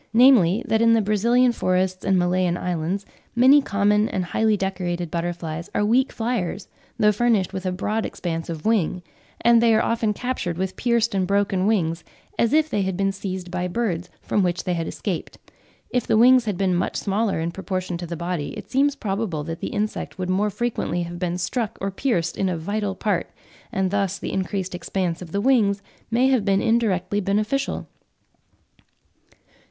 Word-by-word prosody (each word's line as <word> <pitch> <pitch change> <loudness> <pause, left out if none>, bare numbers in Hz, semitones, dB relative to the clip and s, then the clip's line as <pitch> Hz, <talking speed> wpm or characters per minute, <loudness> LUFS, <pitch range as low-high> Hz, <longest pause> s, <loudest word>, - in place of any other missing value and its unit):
namely, 235 -3 +5
that 220 0 +2
in 230 0 +5
the 225 - +4
Brazilian 235 +5 +3
forests 185 -3 0
and 190 - +2
Malayan 180 0 +1
islands, 180 +3 -2 0.3
many 265 +4 +7
common 210 -2 +2
and 185 -2 -2
highly 220 +3 +1
decorated 180 -3 -3
butterflies 170 -1 -4
are 205 - +2
weak 255 +5 +3
flyers, 220 -5 -2 0.3
though 210 -2 +4
furnished 210 -3 +1
with 190 0 -3
a - - 0
broad 210 +4 -1
expanse 165 -2 -4
of 160 -2 -6
wing; 190 -5 +1 0.4
and 235 -1 +5
they 230 -1 +5
"are 220 - +3
often 230 -2 +1
captured 210 -7 -3
with 185 0 -2
pierced 235 -2 +1
and 190 -2 0
broken 200 -1 +1
wings, 170 -6 0 0.4
as 230 - +3
if 310 0 +4
they 210 -9 -1
had 190 -2 -2
been 195 0 +1
seized 190 -2 -5
by 180 0 -2
birds, 180 -4 -2
from 205 - +1
which 175 -1 0
they 180 - -1
had 165 -1 -2
escaped: 185 -6 -4 0.5
if 250 -2 0
the - - +3
wings 250 +1 +6
had 205 -4 -2
been 190 -1 +1
much 175 - -1
smaller 200 -1 0
in 165 +1 -2
proportion 185 -1 -4
to 175 0 -5
the 170 0 -5
body, 170 -3 -3
it - - -10
seems 280 +2 +2
probable 195 -6 -2
that 165 +1 -5
the - - -3
insect 210 -1 -3
would 185 0 -2
more 205 +3 +1
frequently 205 -5 -2
have 170 0 -7
been 180 -1 -1
struck 215 +5 -2
or 195 0 -2
pierced 185 -6 -1
in 190 - +1
a 175 - -2
vital 200 +4 -2
part, 195 -3 -1 0.4
and 190 -1 0
thus 195 -2 0
the - - -5
increased 190 0 -2
expanse 175 0 -2
of 170 -3 -9
the 200 - -1
wings 205 -6 +2 0.3
may 240 +3 +3
have 260 -5 +2
been 195 -1 +2
indirectly 205 -4 +1
beneficial." 210 +7 -1
195 Hz, 185 wpm, -23 LUFS, 180-225 Hz, 0.5 s, many